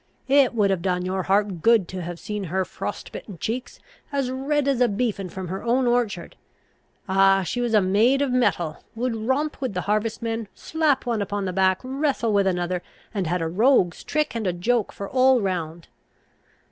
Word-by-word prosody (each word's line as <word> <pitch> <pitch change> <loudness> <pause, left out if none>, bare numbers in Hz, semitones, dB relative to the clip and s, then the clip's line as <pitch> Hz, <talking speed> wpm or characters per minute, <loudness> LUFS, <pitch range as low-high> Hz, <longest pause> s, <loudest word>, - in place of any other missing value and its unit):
It 270 -2 +4
would 205 -3 +3
have 190 -3 0
done 180 0 -1
your 190 +1 -1
heart 195 -2 +1
good 225 -4 +4
to 185 -1 -5
have 175 0 -5
seen 210 -2 -4
her 185 +2 -1
frost - - -6
bitten 200 -5 -8
cheeks, 235 +9 -4 0.3
as 275 -3 -1
red 280 +2 0
as 270 -3 +1
a 245 - +6
beefen 205 -3 -2
from 185 0 -6
her 190 +2 -4
own 245 +2 +1
orchard! 240 -3 0 0.7
Ah! 195 0 +4
she 245 +7 -2
was 235 -2 +1
a 210 - +6
maid 225 +9 +3
of 275 - -1
mettle; 175 -11 0
would 240 +1 -1
romp 265 +7 -1
with 255 -8 -3
the 180 - 0
harvestmen, 225 +2 -1
slap 310 -5 0
one 230 -3 0
upon 200 0 -2
the 185 - -3
back, 190 0 +2
wrestle 265 -4 0
with 200 -1 +3
another, 180 -1 -1 0.3
and 195 -5 -1
had 175 +1 0
a - - -1
rogue's 185 -1 +2
trick 305 0 -1
and 220 -4 -2
a 180 - +1
joke 220 +5 0
for 200 - -6
all 260 +1 +4
round. 170 -5 -3
210 Hz, 195 wpm, -24 LUFS, 185-250 Hz, 0.7 s, a